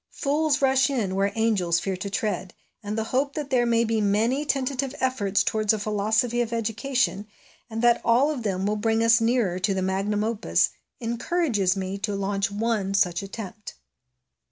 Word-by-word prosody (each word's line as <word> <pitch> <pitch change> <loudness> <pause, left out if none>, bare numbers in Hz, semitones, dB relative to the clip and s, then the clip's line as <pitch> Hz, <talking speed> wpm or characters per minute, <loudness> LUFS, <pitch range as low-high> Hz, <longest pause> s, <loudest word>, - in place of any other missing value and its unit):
Fools 295 0 0
rush 265 -1 +4
in 225 -9 -1
where 195 +1 +1
angels 200 -7 +1
fear 190 +2 -2
to 185 +2 -5
tread; 200 -4 -3 0.3
and 210 0 -4
the 220 - 0
hope 275 +2 0
that 290 -2 -5
there 240 -2 +3
may 230 0 +3
be 225 -1 0
many 220 +7 +1
tentative 275 0 -1
efforts 225 -7 +1
towards 215 -1 +1
a - - 0
philosophy 215 +3 0
of 235 -1 -2
education, 230 -1 -1 0.4
and 225 +1 -4
that 240 -1 +4
all 250 +6 +3
of 280 -5 -4
them 195 -3 -2
will 210 +1 0
bring 225 +1 +1
us 230 0 +5
nearer 225 -6 +1
to 195 +1 0
the 190 - -1
magnum 195 +2 0
opus, 225 0 +1 0.3
encourages 235 - 0
me 190 +1 -4
to 205 0 -2
launch 195 0 -1
one 205 -2 -1
such 180 -3 +2
attempt. 205 +1 -8
220 Hz, 180 wpm, -25 LUFS, 200-245 Hz, 0.4 s, us